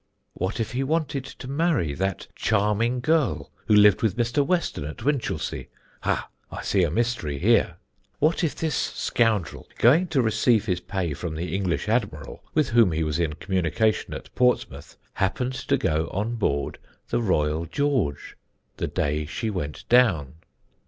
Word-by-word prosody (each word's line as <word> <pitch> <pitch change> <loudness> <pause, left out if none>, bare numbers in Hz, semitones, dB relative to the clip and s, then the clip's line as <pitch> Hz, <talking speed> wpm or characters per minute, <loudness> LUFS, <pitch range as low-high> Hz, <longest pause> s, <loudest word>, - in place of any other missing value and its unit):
"What 95 +5 -3
if 115 - -2
he 130 +2 -1
wanted 145 -2 -1
to 135 -1 -10
marry 140 - +1
THAT 95 +4 -2
CHARMING 110 +4 +1
GIRL, 155 0 +1 0.2
who 105 - +5
lived 105 -2 +6
with 110 0 +1
Mr. 120 +4 +2
Weston 170 - -1
at 75 +8 -7
Winchelsea? 140 -4 -2 0.3
Ha! - - -1 0.2
I - - -6
see 100 - +2
a 85 - +2
mystery 100 -7 -1
here. - - +3 0.4
"What 160 +3 +2
if 150 -4 0
this 160 -1 -2
scoundrel, 110 -9 0
going 155 +10 +5
to 140 -6 +1
receive 110 0 +2
his 90 -4 0
pay 90 -4 -3
from 80 +2 -5
the 85 +4 -4
English 95 0 -1
Admiral, 100 - -2
with 155 -4 +2
whom 115 -7 +4
he 80 +1 0
was 75 +1 -1
in 80 -3 0
communication 95 +7 0
at - - -10
Portsmouth, 125 - 0 0.2
happened 125 +7 -1
to 140 +1 0
go 80 - 0
on 105 +5 -2
board 70 -11 -1 0.3
the - - 0
Royal 80 -5 0
George 130 - -1 0.4
the - - -2
day 75 +1 -1
she 110 +7 -3
went 75 -7 -5
down? 95 - +4
110 Hz, 160 wpm, -25 LUFS, 80-125 Hz, 0.4 s, lived